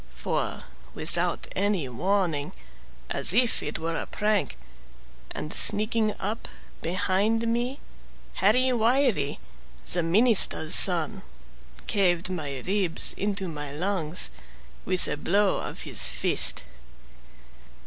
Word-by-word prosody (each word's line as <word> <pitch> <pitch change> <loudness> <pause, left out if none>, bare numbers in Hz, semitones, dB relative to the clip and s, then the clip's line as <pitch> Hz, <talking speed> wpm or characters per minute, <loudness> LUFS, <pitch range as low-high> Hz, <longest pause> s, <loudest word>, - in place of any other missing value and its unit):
For, 60 - -3 0.3
without - - 0
any 195 -7 0
warning, 170 +2 -1 0.6
as 190 - 0
if 245 0 +2
it - - -3
were 165 +1 -4
a - - -4
prank, 210 - -1 0.7
And 150 - -6
sneaking 215 0 +2
up 215 +4 -4 0.3
behind 200 +6 0
me, 240 +4 -2 0.5
Harry 250 +6 +2
Wiley, 230 - +1 0.5
The 175 - +3
minister's 185 -2 +4
son, 185 +2 +2 0.6
caved 185 -4 0
my 145 -7 -5
ribs 190 -3 0
into 200 -1 -3
my 150 -3 -7
lungs, 175 +1 0 0.5
With 185 -1 +7
a - - -3
blow 200 +6 +1
of - - -7
his - - +3
fist. - - +1
190 Hz, 105 wpm, -25 LUFS, 165-215 Hz, 0.7 s, With